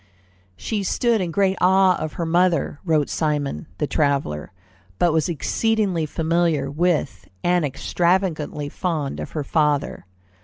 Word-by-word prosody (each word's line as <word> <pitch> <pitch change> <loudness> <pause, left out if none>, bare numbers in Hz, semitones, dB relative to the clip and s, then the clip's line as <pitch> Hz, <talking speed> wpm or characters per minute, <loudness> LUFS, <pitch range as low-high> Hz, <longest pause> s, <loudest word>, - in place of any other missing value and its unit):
"She 215 - -3
stood 230 +3 +1
in 180 - -2
great 190 +2 +1
awe 190 0 +5
of 155 -1 -4
her 170 - -3
mother," 170 -2 +1
wrote 155 -5 +2
Simond, 145 - -2
the - - 0
traveller, 140 - -1 0.5
"but 175 -2 +2
was 160 +1 +1
exceedingly 190 0 0
familiar 160 -3 0
with 160 -2 -1 0.2
and 175 -1 +2
extravagantly 160 +1 0
fond 155 -3 -3
of - - -7
her 150 - -2
father. 150 - 0
165 Hz, 130 wpm, -22 LUFS, 150-180 Hz, 0.5 s, awe